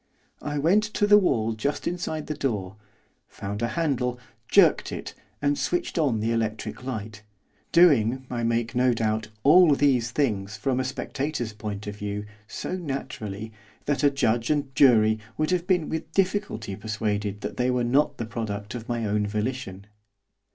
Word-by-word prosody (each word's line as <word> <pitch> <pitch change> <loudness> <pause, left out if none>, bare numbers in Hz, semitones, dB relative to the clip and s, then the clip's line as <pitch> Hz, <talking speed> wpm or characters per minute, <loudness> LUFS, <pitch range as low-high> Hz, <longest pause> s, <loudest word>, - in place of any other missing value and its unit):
I 145 0 -3
went 175 +9 +3
to 205 - +3
the 205 0 +7
wall 115 - +1
just 140 +7 -2
inside 160 -3 -3
the 155 - -3
door, 105 -10 -2 0.5
found 100 +2 -6
a 115 - +1
handle, 125 -3 -1 0.3
jerked - - +4
it, - - -6 0.3
and 145 0 +2
switched 175 -1 -1
on 135 -8 +2
the 115 +2 0
electric 110 +1 -2
light, 110 -4 -5 0.5
doing, 130 -7 +4
I 120 -2 -3
make 115 0 0
no 125 0 +3
doubt, 110 -1 -1 0.2
all 155 +1 +7
these 130 -5 +2
things, 105 -7 -1
from 130 -2 0
a - - +1
spectator's 130 -2 -3
point 105 -1 -6
of 105 0 -6
view, 105 0 -4 0.2
so 185 - -4
naturally, 110 - -5 0.3
that 145 0 0
a 145 - +6
judge 120 -4 0
and 145 -3 0
jury 110 -5 +5 0.2
would 155 +2 0
have 180 -1 0
been 180 -5 +2
with 160 0 -4
difficulty 195 - -1
persuaded 105 -1 -2
that 105 +1 -5
they 125 +1 +1
were 125 -1 +1
not 140 +4 +2
the 115 - -3
product 105 -2 -5
of 120 -1 -7
my 120 -2 -1
own 105 0 0
volition. 105 -2 -3
120 Hz, 165 wpm, -26 LUFS, 110-145 Hz, 0.5 s, the